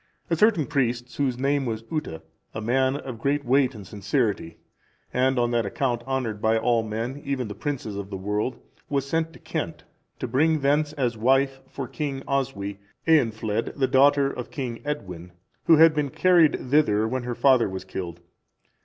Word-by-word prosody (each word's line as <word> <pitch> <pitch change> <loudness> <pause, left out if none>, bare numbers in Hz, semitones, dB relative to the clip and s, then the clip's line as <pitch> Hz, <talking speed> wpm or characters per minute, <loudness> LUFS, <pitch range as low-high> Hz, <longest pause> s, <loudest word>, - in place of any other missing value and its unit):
A - - +4
certain 200 -4 +3
priest, 125 -4 -1
whose 130 -4 0
name 140 +2 +1
was 110 -1 -3
Utta,(365) 115 - -4 0.3
a 110 - -3
man 130 +4 +1
of 130 -5 -6
great 140 +3 0
weight 130 0 +3
and 100 -3 -9
sincerity, 100 - -1 0.6
and 130 +1 +2
on 120 0 +2
that 120 -1 +2
account 120 +2 -1
honoured 125 -6 -2
by 110 +1 +3
all 115 +1 +2
men, 115 +5 -4
even 135 -4 -2
the 105 - -6
princes 130 -5 -4
of 100 -1 -5
the 100 - -5
world, 105 +6 -2 0.3
was 140 -1 -1
sent 165 +2 0
to - - -13
Kent, - - -5 0.3
to - - -4
bring 155 +5 +2
thence, 145 +2 +2
as 125 -6 -1
wife 135 +3 +2
for 135 -1 -6
King 135 0 -4
Oswy, 125 -8 -2 0.3
Eanfled,(366) 115 -8 +1
the 135 -2 +2
daughter 140 +1 +4
of 125 - -6
King 125 -5 -5
Edwin, 90 - -5 0.3
who 165 - +7
had 160 0 +7
been 150 -2 0
carried 165 -6 +3
thither 110 -8 +3
when 130 +3 -2
her 120 0 -4
father 130 -5 +4
was 95 0 -6
killed. 85 -2 -6
130 Hz, 180 wpm, -25 LUFS, 110-140 Hz, 0.6 s, who